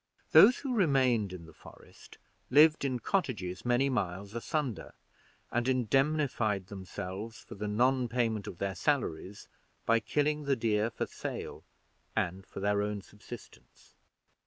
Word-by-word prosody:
Those 250 - +8
who 270 -3 -3
remained 130 - +2
in 90 -3 -8
the 80 - -14
Forest - - -16 0.3
lived 150 +3 +6
in 130 -2 0
cottages 110 - -2
many 125 +3 +2
miles 100 -5 -2
asunder, 125 0 -3 0.6
and 120 +1 0
indemnified 125 -5 +1
themselves 95 +3 -6
for - - -11
the 105 0 -4
non 125 +4 +2
payment 115 -4 -1
of 85 - -7
their 100 +2 -2
salaries 100 - -2 0.4
by 115 0 +4
killing 150 +5 0
the 140 -1 +2
deer 110 -2 +1
for - - -3
sale - - -6 0.5
and 95 +2 -2
for - - -8
their 100 +1 +1
own 105 -1 -3
subsistence. 105 +3 -13
115 Hz, 135 wpm, -31 LUFS, 100-135 Hz, 0.6 s, Those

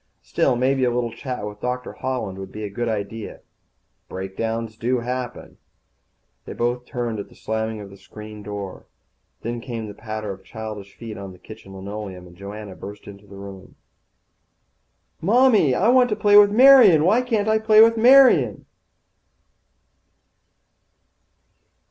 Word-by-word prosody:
Still, 130 - +1
maybe 130 +2 +1
a 125 - +3
little 120 -1 -2
chat 125 -2 -6
with 105 0 -9
Doctor 125 0 -4
Holland 110 -8 -4
would 95 0 -8
be 110 - -7
a 105 - -5
good 120 +3 -3
idea. 110 0 -5 0.7
Breakdowns 110 +4 -4
do 125 +3 -1
happen. 125 0 -6 0.9
They - - -7
both 120 +1 -2
turned 120 -3 -4
at 100 - -7
the - - -19
slamming 110 0 -3
of 100 -1 -11
the 100 - -13
screen 105 +1 -11
door. 100 -2 -8 0.6
Then 120 +1 -4
came 115 -3 -6
the 105 - -8
patter 110 0 -6
of 95 - -10
childish 110 -3 -8
feet 110 -3 -8
on 100 -1 -8
the - - -15
kitchen 95 +1 -13
linoleum, 95 -1 -7
and 90 0 -15
Joanna 100 +1 -9
burst 105 +1 -10
into 100 0 -13
the 100 - -13
room. 100 -1 -11 1.5
"Mommy, 215 - +4
I 205 - +2
want 250 0 +5
to 210 - 0
play 205 -1 +3
with 205 0 +8
Marian. 225 - +7
Why 215 +7 +4
can't 225 -4 -1
I 220 0 +3
play 215 0 +4
with 230 +1 +7
Marian?" 255 +3 +5
115 Hz, 155 wpm, -22 LUFS, 105-145 Hz, 1.5 s, with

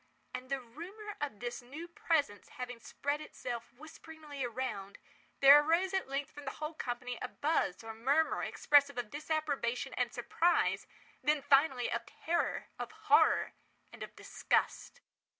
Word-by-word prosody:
And 255 0 -6
the 275 0 0
rumour 355 - -9
of 280 -9 -3
this 240 0 -4
new 290 +8 -8
presence 310 - 0
having 250 -1 -6
spread 285 +6 -3
itself 245 -6 -6
whisperingly 310 +1 -9
around, 235 -5 -4 0.4
there 280 +2 +10
arose 335 +5 +2
at 380 -5 0
length 275 0 -2
from 290 0 -10
the 270 - -3
whole 305 +1 -4
company 245 -3 -4
a - - -2
buzz, 285 - 0
or 225 0 -6
murmur, 275 +8 +2
expressive 285 -2 +3
of 240 -3 -3
disapprobation 290 -5 -1
and - - 0
surprise—then, 305 -4 0
finally, 270 -3 +4
of 235 0 -2
terror, 340 +1 -1
of - - -4
horror, - - +3 0.4
and - - -12
of - - -7
disgust. 485 - -1
280 Hz, 145 wpm, -33 LUFS, 245-315 Hz, 0.4 s, there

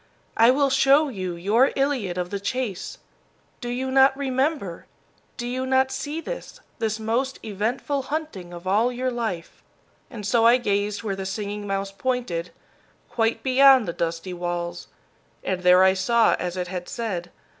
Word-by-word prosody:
"I 230 +1 +6
will 275 +1 +3
show 275 +3 +4
you 185 -7 -4
your 210 +10 +3
Iliad 260 -10 0
of 180 0 -3
the 200 - -2
chase. 215 -2 -3 0.6
Do 240 - -5
you 260 +2 -2
not 265 0 +5
remember, 265 - -1 0.5
do 240 - -4
you 255 +2 -2
not 265 0 +3
see 300 +2 -4
this, - - -7 0.2
the 220 -1 -1
most 240 +5 -1
eventful 230 +7 -2
hunting 290 - -4
of 175 +1 -10
all 215 +6 +2
your 255 +1 -2
life?" 225 -9 -4 0.5
And 215 -5 -8
so 230 +2 +3
I 235 +2 +7
gazed 205 -2 -1
where 200 -3 -2
the 190 0 -5
Singing 205 +1 -4
Mouse 195 0 -2
pointed, 200 -6 -2 0.6
quite 230 -1 0
beyond 265 -2 +6
the 170 - -2
dusty 170 +2 -3
walls, 175 0 -4 0.6
and 185 -1 -2
there 180 +1 +6
I 190 0 +5
saw 225 +5 +3
as 180 0 -3
it 180 -1 -2
had 180 -1 -6
said. 220 -10 -4
225 Hz, 165 wpm, -24 LUFS, 185-260 Hz, 0.6 s, I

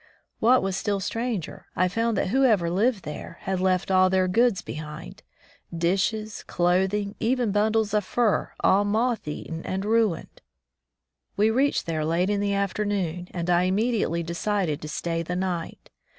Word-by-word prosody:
What 245 +1 +4
was 195 -1 -1
still 200 0 -1
stranger, 225 -2 -4
I 185 - +3
f 180 - -3
oimd 230 0 +1
that 195 - 0
whoever 220 -8 +3
lived 210 +2 +1
there 150 +2 -7
had 190 -1 -2
left 185 0 +1
all 185 0 +5
their 185 0 +2
goods 225 +1 +2
behind, 150 - -8 0.6
dishes, 205 +5 0
clothing, 190 +4 0
even 240 -1 +1
bundles 215 +1 +1
of 210 -1 +2
furs 220 +2 +1
all 200 +2 +4
moth 220 0 0
eaten 160 +2 -5
and 190 +1 -3
ruined. 220 -5 0 1.0
We 215 +2 +4
reached 270 +5 +1
there 160 -2 -2
late 170 +5 +1
in 205 - 0
the 200 0 0
afternoon, 200 -3 -1
and 170 -1 -4
I 175 0 +3
immediately 200 -3 0
de 170 +1 -5
cided 180 -5 -1
to 155 - -6
stay 165 +2 -2
the 170 +2 -4
night. 180 -2 -4
195 Hz, 165 wpm, -25 LUFS, 175-215 Hz, 1.0 s, all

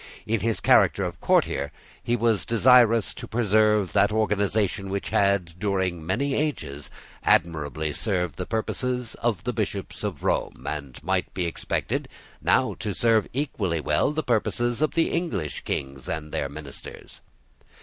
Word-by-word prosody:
In 115 +1 0
his 115 +1 0
character - - +4
of - - -5
courtier 70 +1 +2 0.3
he 120 - 0
was 115 -3 +1
desirous 115 -1 +5
to - - -8
preserve 105 -3 +2
that 105 - +4
organisation 105 -2 0
which 100 0 -3
had, 95 -4 +1
during 95 -4 -1
many 120 - 0
ages, 80 - -3 0.3
admirably 80 -2 +1
served 90 -7 -1
the 90 - -4
purposes 125 +2 -2
of 110 -7 0
the 125 - -2
Bishops 105 -3 -3
of 95 -9 -4
Rome, 60 - -1
and 70 -4 -5
might - - 0
be 90 - 0
expected 85 - -2 0.3
now - - +3
to 100 -3 -3
serve 115 0 +3
equally 105 - -1
well 75 - +1
the 155 +1 -2
purposes 120 +1 0
of 155 - +1
the 165 - +2
English 160 - -2
Kings 65 -1 -4
and 80 -1 -2
of 75 - -14
their 70 - -2
ministers. 70 -1 -10
100 Hz, 150 wpm, -25 LUFS, 85-115 Hz, 0.3 s, desirous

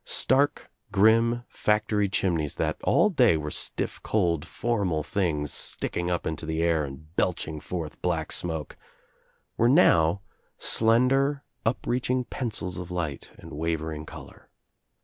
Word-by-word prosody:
Stark 140 +2 +1 0.2
grim 115 +3 +4
factory 105 -1 0
chimneys, 85 -7 0
that - - -1
all 210 - +3
day 125 - +4
were 75 -1 -4
stiff - - -1
cold 85 -6 0
formal 100 -11 -1
things 75 -5 -1
sticking 85 0 -1
up 90 -1 -1
into 80 -1 -4
the 80 +1 -1
air 85 -2 +2
and 75 +4 -9
belching 80 -4 -1
J - - -19
forth 85 -4 -5
black - - -1
smoke, 80 -4 -1 0.8
were 115 - +4
now 95 - +4 0.4
slender 135 +5 +2 0.2
upreaching 125 +2 0
pencils 95 -8 -3
1 - - -3
of 85 - -13
light 85 -6 -4
and - - -12
wavering 80 0 -3
color. - - -12
90 Hz, 135 wpm, -26 LUFS, 80-115 Hz, 0.8 s, grim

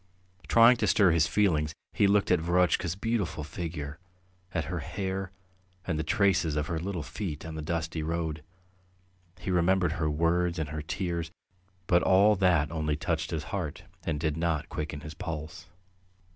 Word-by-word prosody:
Trying 115 +5 +7
to - - 0
stir 100 -4 +5
his 80 -1 +3
feelings, 80 -6 +1 0.2
he 100 - +4
looked 100 -1 +3
at 90 - +5
Verotchka's 85 0 +2
beautiful 100 -7 -2
figure, 80 -2 -5 0.5
at 85 -3 -1
her 85 +1 -3
hair 95 +4 -3 0.6
and 80 -4 -1
the - - 0
traces 90 -4 +2
of 75 0 0
her 80 0 -2
little 90 -1 -3
feet 80 -8 -5
on 80 - -6
the 80 - -5
dusty 80 0 -2
road; 80 -1 -2 1.0
he 95 - -3
remembered 90 -1 +3
her 80 -1 -1
words 85 +3 +1
and 80 -2 -2
her 75 +1 -4
tears, 85 0 -3 0.6
but 90 -2 +4
all 100 +3 +5
that 85 -6 +3
only 75 -2 -1
touched 80 +1 -2
his 80 -3 -3
heart 85 -7 -3 0.2
and 75 -3 -2
did 80 0 -1
not 80 -3 -1
quicken 75 -1 -4
his 75 0 -8
pulse. 80 +2 -6
85 Hz, 165 wpm, -29 LUFS, 80-90 Hz, 1.0 s, Trying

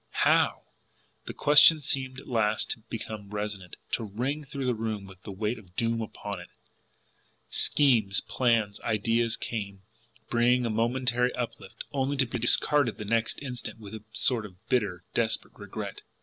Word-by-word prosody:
HOW! - - +3 0.6
The - - -5
question 150 +2 +7
seemed 135 -2 -2
at - - -13
last 110 -2 +1
to - - -3
become 110 -2 -6
resonant, 105 -3 -4 0.2
to - - 0
ring 125 +9 -2
through 140 -1 -5
the 125 - +2
room 110 -3 -3
with 95 -1 -14
the 100 - -8
weight 105 +4 -2
of 90 -4 -19
doom 115 +1 0
upon 105 -3 -5
it. 85 - -11 1.0
Schemes, 115 -9 +3
plans, 115 -5 +1
ideas 115 +1 +1
came, 100 -4 -5 0.4
bringing 120 +1 +3
a 115 - 0
momentary 125 +2 +1
uplift 120 -2 -5
only 140 0 0
to 135 - +4
be 120 0 -4
discarded 120 +1 +3
the 105 - -6
next 115 +5 0
instant 125 -4 -5
with 105 -1 -10
a 110 -1 -7
sort 115 0 +2
of 95 -3 -13
bitter, 100 -8 +1
desperate 115 -1 0
regret. - - -6
115 Hz, 160 wpm, -28 LUFS, 105-125 Hz, 1.0 s, question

